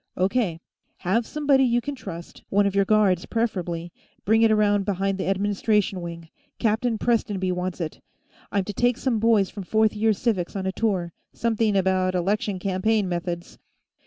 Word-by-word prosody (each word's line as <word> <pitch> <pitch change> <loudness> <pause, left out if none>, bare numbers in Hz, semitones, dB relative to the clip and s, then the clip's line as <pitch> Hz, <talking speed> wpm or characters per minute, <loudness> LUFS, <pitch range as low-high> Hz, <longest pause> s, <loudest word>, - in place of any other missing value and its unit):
"O. 185 - +3
K. 195 -7 -1 0.4
Have 220 +6 0
somebody 285 -3 +2
you 240 -2 +3
can 285 +4 -4
trust 170 -10 -9
one 200 +1 +3
of 200 - 0
your 200 0 +3
guards, 200 -4 +2
preferably 175 -7 -2 0.3
bring 220 +2 +4
it 225 - +5
around 205 -2 +3
behind 195 0 -1
the - - -2
Administration 200 0 +1
Wing. 170 -1 -7 0.3
Captain 225 +1 +1
Prestonby 205 -5 0
wants 180 0 -3
it. 160 -3 -5 0.5
I'm 200 -1 +1
to 205 - -6
take 245 +3 +2
some 250 -5 0
boys 220 -3 +3
from 205 - -7
Fourth 220 +3 +2
Year 220 +1 +2
Civics 195 -4 -1
on 190 -1 -3
a 190 - 0
tour. 190 -5 -1 0.2
Something 225 -2 0
about 185 -1 +1
election 195 +2 0
campaign 195 +3 0
methods." 175 -1 -4
200 Hz, 170 wpm, -24 LUFS, 185-220 Hz, 0.5 s, it